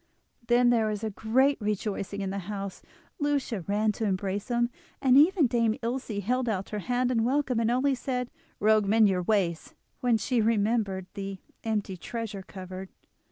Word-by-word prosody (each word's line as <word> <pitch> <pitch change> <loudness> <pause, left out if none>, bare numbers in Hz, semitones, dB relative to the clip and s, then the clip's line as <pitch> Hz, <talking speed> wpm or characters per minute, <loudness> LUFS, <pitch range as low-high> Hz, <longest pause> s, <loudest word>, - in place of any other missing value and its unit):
Then 240 0 +5
there 225 -2 +3
was 215 0 -2
great 260 +6 +2
rejoicing 205 -1 -2
in 195 -1 -2
the 200 - -3
house; 200 -2 -5 0.4
Lucia 285 - 0
ran 210 +2 +2
to 220 +2 -3
embrace 195 0 -1
him, 240 0 +1 0.3
and 260 -2 +4
even 320 +3 +6
Dame 230 -2 +2
Ilse 230 -4 -3
held 250 +3 0
out 195 -3 -2
her 210 - -3
hand 245 +4 0
in 230 -3 +2
welcome, 260 -1 +1
and 230 0 +2
only 260 +3 +2
said: 250 -1 -3 0.3
"Rogue, 215 -1 +4
mend 220 +1 +5
your 185 -1 +1
ways," 180 -4 0 0.2
when 245 -2 +3
she 240 +1 0
remembered 210 -3 +1
the 195 -1 -5 0.3
empty 210 -4 -2
treasure 225 0 -5
cupboard. 185 0 -8
220 Hz, 165 wpm, -28 LUFS, 200-245 Hz, 0.4 s, even